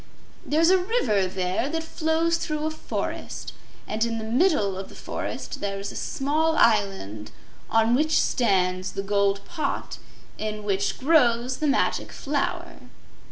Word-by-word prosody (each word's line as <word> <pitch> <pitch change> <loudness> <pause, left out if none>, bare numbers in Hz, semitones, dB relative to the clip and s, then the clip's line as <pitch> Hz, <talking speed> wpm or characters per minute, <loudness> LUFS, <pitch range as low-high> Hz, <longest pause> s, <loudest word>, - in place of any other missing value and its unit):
There's 330 +4 +3
a 380 - +5
river 260 - +1
there 185 +7 -1
that 325 +1 -2
flows 325 +1 +1
through 305 -2 -2
a 315 - 0
forest, 315 - -5 0.3
and 220 +1 -1
in 230 -1 -1
the 220 - -4
middle 230 - +2
of 190 +1 -6
the - - -13
forest - - -5
there 195 -1 -2
is 200 - -5
a - - -11
small 310 +4 0
island 195 - +1 0.4
on 225 +1 +3
which 310 +4 +3
stands 185 -5 +1
the 195 - -3
gold 200 0 +1
pot 325 -3 -3 0.4
in 215 -1 -3
which 200 -1 0
grows 255 -4 +3
the 305 - 0
Magic 280 - +1
Flower." 285 0 -2
230 Hz, 150 wpm, -25 LUFS, 200-310 Hz, 0.4 s, a